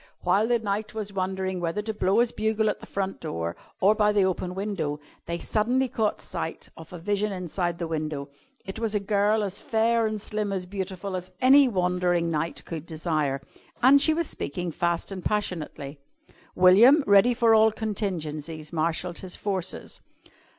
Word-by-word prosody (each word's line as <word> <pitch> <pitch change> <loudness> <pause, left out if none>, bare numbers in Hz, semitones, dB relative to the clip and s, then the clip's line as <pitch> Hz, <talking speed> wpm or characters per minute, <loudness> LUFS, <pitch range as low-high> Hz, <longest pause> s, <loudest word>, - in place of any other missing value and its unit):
While 195 +5 +2
the 240 0 +3
knight 210 0 -3
was 205 -2 -4
wondering 190 -1 -2
whether 175 +4 -2
to 220 +1 -3
blow 205 +2 +2
his 240 - +1
bugle 220 0 +1
at - - -8
the - - -12
front 195 -6 -3
door 85 -5 -4 0.2
or 200 +3 +5
by 210 -1 +3
the 205 -2 +3
open 180 -1 -2
window, 185 -7 -3 0.3
they 170 0 -2
caught 230 +2 0
sight - - -5
suddenly - - -14
of 165 -1 -12
a 180 - -7
vision 205 +4 -1
inside 180 -2 -2
the 170 - -3
window. 155 -3 -3 0.4
It 195 +3 -6
was 225 -2 -1
a - - +3
girl 205 +1 +1
as 200 -1 -3
fair 225 0 +2
and 215 -1 -3
slim 210 0 -2
and 185 -2 -3
beautiful 190 0 -4
as 180 0 -6
any 270 +2 +7
wandering 180 -4 +1
knight 165 +1 -3
could 165 -1 -6
desire. 155 -4 -1 0.4
And 275 +2 +7
she 310 +2 +4
was 335 +1 0
speaking 170 +5 -4
fast 170 +3 -1
and 185 -2 -6
passionately. 155 -8 -3 0.6
William, 225 - +7
ready 205 +5 +5
for 230 -1 +4
all 220 0 +6
contingencies, 165 -8 -4
marshalled 170 +2 -1
his 185 -2 -6
forces. 190 -3 -4
190 Hz, 175 wpm, -26 LUFS, 170-215 Hz, 0.6 s, any